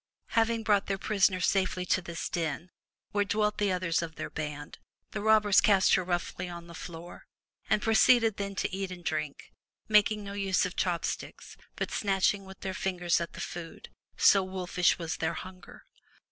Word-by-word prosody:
Having 230 0 +1
brought 205 -2 +2
their 195 - -1
prisoner 195 -2 +2
safely 185 -1 +1
to 185 - +1
this 170 -1 -5
den, 165 +1 -3 0.4
where 205 -1 +2
dwelt 210 +1 0
the 205 -2 +2
others 175 -2 0
of 165 -2 -6
their - - -6
band, 150 -1 -6 0.3
the - - -4
robbers 215 -2 +5
cast 195 -3 +4
her 185 - +3
roughly 175 0 -3
on 170 -1 -8
the 170 - -12
floor, 170 0 -9 0.4
and 210 - +2
proceeded 225 0 +4
then 200 -1 -4
to 190 - -2
eat 195 -1 -3
and 175 -2 -9
drink, 155 -3 -4 0.3
making 210 0 +3
no 200 0 -7
use 195 -2 +1
of 180 - -5
chop 175 -3 0
sticks, - - -6 0.2
but - - -3
snatching 195 0 +1
with 190 0 -13
their 190 - -3
fingers 180 -3 0
at 170 - -5
the - - -9
food, 170 -2 -7 0.3
so 200 - +6
wolfish 185 -1 0
was 165 -2 -4
their 160 - -1
hunger. 185 0 -10
185 Hz, 180 wpm, -29 LUFS, 175-205 Hz, 0.4 s, so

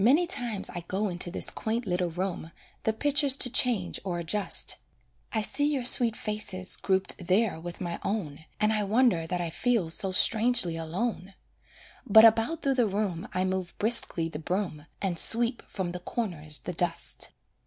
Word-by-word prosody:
Many 290 +10 +4
times 240 - -2
I 175 - -6
go 200 +2 -2
into 175 0 -4
this 175 - -2
quaint 230 +2 -3
little 180 -2 -1
room, 180 -1 -5 0.4
The 220 - +2
pictures 280 +3 +2
to 250 -3 +3
change 235 -8 +2
or 180 -3 -4
adjust; 175 +5 +1 0.5
I 220 - -1
see 290 +7 +2
your 265 -4 -2
sweet 235 -2 +7
faces 210 -4 -1
grouped 190 -2 0
there 195 -2 +1
with 175 +1 -8
my 175 -2 -5
own, 160 -7 -4
And 215 +1 +2
I 215 - 0
wonder 205 -5 +1
that 180 +1 -3
I 170 -2 -4
feel 225 -5 0
so 190 +3 +3
strangely 220 -2 +3
alone; 185 +4 -4 0.7
But 220 +2 +8
about 225 +8 +2
through 275 - +1
the 230 - +1
room 195 -4 -3
I 185 0 -1
move 185 -1 -4
briskly 210 -7 +2
the 160 -2 -7
broom, 170 -3 -4 0.2
And 180 -4 -1
sweep 235 +1 +3
from 185 -3 -5
the 180 - -6
corners 170 -8 -3
the 180 - -6
dust. 170 0 -3
195 Hz, 175 wpm, -27 LUFS, 175-230 Hz, 0.7 s, But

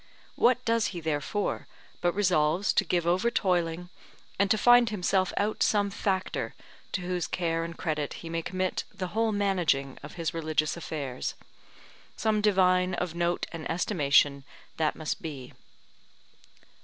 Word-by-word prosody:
What 250 0 +3
does 230 -1 +2
he - - -2
therefore, 160 +6 -2 0.3
but 175 0 +2
resolves 180 -1 +2
to - - +3
give 175 -2 0
over 185 +7 +2
toiling, 175 -4 0 0.5
and 200 0 +3
to 215 - +4
find 240 +2 +6
himself 190 -2 +1
out 210 +2 0
some 205 -1 +2
factor, 190 -1 -2 0.4
to 185 - -1
whose 180 -1 -2
care 165 -2 -1
and 165 0 -6
credit 150 -4 -2
he 170 - -9
may 165 0 -2
commit 185 +2 -2
the 190 -3 -5
whole 225 +4 +1
managing 180 -10 0
of 150 - -9
his 170 0 -2
religious 155 -2 0
affairs; 145 -6 -4 0.8
some 215 -1 +1
divine 185 -3 +3
of 175 -2 -3
note 175 0 0
and 165 -2 -6
estimation 145 -5 +2 0.3
that 155 -2 +1
must 155 -1 -3
be. 140 -6 -7
175 Hz, 145 wpm, -28 LUFS, 160-200 Hz, 0.8 s, find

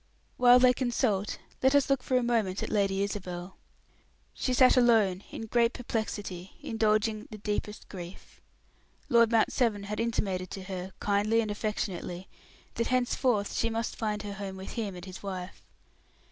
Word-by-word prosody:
While 245 0 +7
they 250 0 +6
consult, 235 -5 0 0.2
let 265 +2 +4
us 285 - +4
look 275 -2 +2
for 255 - +1
a 250 - +1
moment 220 -6 0
at - - -4
Lady 195 -2 +1
Isabel. 185 -2 -5 0.8
She 255 - -2
sat 255 0 +6
alone, 220 -6 +4
in 225 - -6
great 235 +1 +2
perplexity, 205 -6 -4
indulging 215 -1 +1
the 215 - -8
deepest 210 0 -4
grief. 180 -1 -10 0.7
Lord 235 -1 +5
Mount 225 -1 +3
Severn 220 -5 +1
had 210 +1 -4
intimated 195 -6 -1
to 195 - -7
her, 185 0 -6
kindly 210 +2 +2
and 220 -2 0
affectionately, 190 -4 -3 0.5
that 230 - -1
henceforth 245 -4 +1
she 230 - 0
must 230 +1 -2
find 210 -2 -2
her 205 -1 -5
home 195 -1 -6
with 190 - -7
him 210 -5 -3
and 180 0 -9
his 185 -1 -9
wife. 185 -2 -6
210 Hz, 160 wpm, -29 LUFS, 195-235 Hz, 0.8 s, While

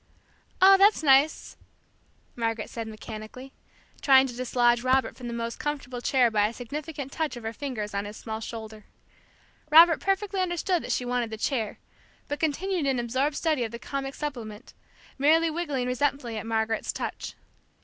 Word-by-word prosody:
"Oh, 390 +1 +9
that's 405 -3 +5
nice!" 280 +2 +3 0.8
Margaret 225 -2 -2
said 230 -1 -5
mechanically, 220 +4 -9 0.5
trying 265 -1 +6
to 255 - -5
dislodge 240 -1 +2
Robert 260 +1 +1
from 245 - -8
the - - -4
most 235 0 -4
comfortable 270 -4 -4
chair 245 -2 +3
by 210 -1 +3
a 220 - -6
significant 280 +3 -6
touch 310 -5 -2
of 240 - -10
her 225 +1 -4
fingers 230 -7 -5
on 200 0 -2
his 210 +1 -8
small 220 -1 -5
shoulder. 220 -1 -8 0.8
Robert 325 +1 +8
perfectly 390 0 -1
understood 350 0 0
that - - -5
she 250 - -1
wanted 245 -1 -1
the 220 - -6
chair, 225 -3 -2 0.5
but 290 0 -4
continued 325 +1 -1
in 265 -2 +1
absorbed 260 +5 -1
study 310 -6 0
of 225 - -4
the 235 - -6
comic 270 +4 -5
supplement, 240 -7 -6 0.5
merely 320 +3 +4
wriggling 295 -6 -2
resentfully 250 -1 -1
at 215 +1 -5
Margaret's 220 -1 -1
touch. - - -5
255 Hz, 165 wpm, -27 LUFS, 230-295 Hz, 0.8 s, Oh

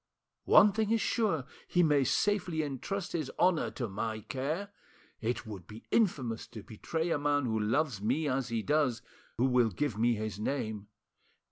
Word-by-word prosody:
One 205 - +7
thing 215 +1 0
is 225 0 +3
sure, 205 - 0 0.2
he 175 - +3
may 145 -4 +4
safely 175 - +1
entrust 165 +7 -4
his 155 -5 -2
honour 180 -3 +3
to 120 - -4
my 110 +2 -3
care. 145 - -3 0.5
It 120 +1 -2
would 100 -5 -8
be 110 +2 -11
infamous 130 - +1
to 110 -4 -10
betray 160 +9 -3
a 145 - +1
man 145 -1 +1
who 110 -2 0
loves 115 +1 0
me 135 +9 0
as 130 -2 0
he 115 -2 -1
does, 145 -4 +1 0.3
who 125 - +3
will 125 -3 +3
give 110 +2 -2
me 120 +1 +3
his 110 -1 -4
name. 110 -4 -3
135 Hz, 170 wpm, -31 LUFS, 110-160 Hz, 0.5 s, One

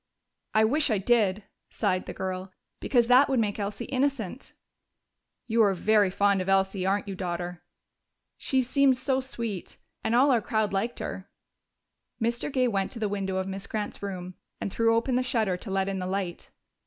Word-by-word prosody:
"I 220 0 +6
wish 295 +6 +2
I 215 - +2
did," 205 -1 +2 0.3
sighed 185 -4 -1
the - - -4
girl. 185 0 -4 0.3
"Because 240 -3 +2
that 250 +4 +6
would 265 -3 +2
make 210 -1 0
Elsie 200 0 -3
innocent." 265 -4 -2 0.9
"You 230 0 +2
are 200 -3 +4
very 210 +1 +3
fond 200 0 +2
of 185 - -3
Elsie, 195 -1 +2
aren't 200 +1 0
you, 195 - -4
Daughter?" 175 -1 -4 0.7
"She 260 -1 0
seemed 265 +1 +3
so 265 +1 0
sweet. 230 -7 -5 0.3
And 225 - +1
all 270 +3 +5
our 240 -3 +3
crowd 215 -1 0
liked 225 +5 -1
her." 190 - -6 0.9
Mr. 235 +4 -1
Gay 255 -2 +2
went 195 -4 -1
to 235 - -7
the 215 - 0
window 195 -2 -2
of 190 0 -1
Miss 195 +1 -5
Grant's 210 -1 -4
room 185 -2 -5 0.3
and 200 - -4
threw 230 0 +3
open 245 +2 +1
the - - +2
shutter 225 -7 0
to 195 - -9
let 195 0 0
in 195 -1 -2
the 180 - -3
light. 185 -2 -3
205 Hz, 185 wpm, -27 LUFS, 190-240 Hz, 0.9 s, I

